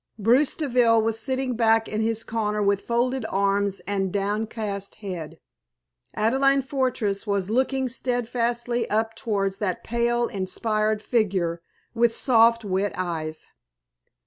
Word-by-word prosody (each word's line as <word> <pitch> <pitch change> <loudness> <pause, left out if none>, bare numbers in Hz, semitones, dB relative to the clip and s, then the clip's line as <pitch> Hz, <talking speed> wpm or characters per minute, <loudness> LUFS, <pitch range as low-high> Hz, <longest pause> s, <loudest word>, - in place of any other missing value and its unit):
Bruce 240 +7 +3
Deville 245 -6 +3
was 225 0 0
sitting 260 +2 -1
back 225 -1 +3
in 215 +1 -2
his 225 0 0
corner 210 -2 -1
with 200 0 +2
folded 245 +2 0
arms 200 0 0
and 195 +1 -2
downcast 205 0 -3
head. 175 -6 -7 0.8
Adelaide 270 +5 +2
Fortress 250 -7 -1
was 200 -1 -1
looking 265 +2 +1
steadfastly 240 -1 -1
up 225 +1 0
towards 200 -4 -2
that 185 -4 -2
pale, 240 +1 +1
inspired 215 +2 -1
figure, 185 -7 0 0.3
with 235 0 +3
soft, 230 -2 +4
wet 195 +1 0
eyes. 160 -3 -4
220 Hz, 120 wpm, -24 LUFS, 200-240 Hz, 0.8 s, soft